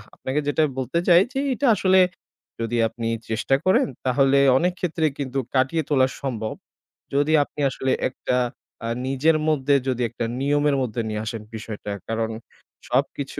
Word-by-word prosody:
আপনাকে 130 +3 -2
যেটা 145 +2 +2 0.2
বলতে 130 +6 -1
চাই 175 0 +7
যে 270 - -1
এটা 275 +2 0
আসলে 190 -1 +4 0.6
যদি 115 +1 -1
আপনি 115 0 -5 0.2
চেষ্টা 115 +4 +1
করেন 185 - +4 0.2
তাহলে 135 +2 +3 0.2
অনেক 180 +5 +1
ক্ষেত্রে 165 -2 0
কিন্তু 135 -1 -2 0.2
কাটিয়ে 135 +5 +2
তোলা 130 -3 +4
সম্ভব। 115 -6 -3 0.6
যদি 145 +2 +2
আপনি 145 - -13
আসলে 130 0 -2 0.2
একটা 125 -1 -2 0.5
আ - - -2 0.2
নিজের 145 +4 +2
মধ্যে 145 -2 +2
যদি 125 -2 -1
একটা 120 0 -4
নিয়মের 145 +1 +2
মধ্যে 120 -2 -2
নিয়ে 105 0 -3
আসেন 110 0 -4
বিষয়টা। 110 -1 -6 0.2
কারণ 115 0 -1 0.6
সবকিছু 135 +2 -1
135 Hz, 150 wpm, -23 LUFS, 120-150 Hz, 0.6 s, চাই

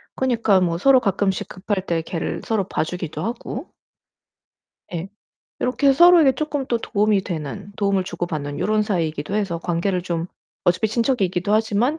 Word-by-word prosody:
그니까 230 -7 +2
뭐 170 -2 +1
서로 260 +7 +5
가끔씩 195 -3 0
급할 190 0 -3
때 170 -2 0
개를 165 0 -4
서로 210 -4 0
봐 - - 0
주기도 170 -2 -5
하고 240 +5 -5 1.3
예. 175 +2 -4 0.5
요렇게 275 +2 +3
서로에게 335 -1 +7
쪼끔 290 -2 -3
또 235 -2 0
도움이 210 -3 +1
되는 155 - -6
도움을 200 -2 +1
주고 175 -1 -4
받는 145 -3 -4
요런 215 0 +1
사이이기도 165 -4 -2
해서 195 -5 -1
관계를 175 +2 -1
좀 170 -2 -2 0.4
어차피 180 +5 +2
친척이기도 210 -5 0
하지만 225 +7 +1
200 Hz, 345 characters per minute, -22 LUFS, 175-230 Hz, 1.3 s, 서로에게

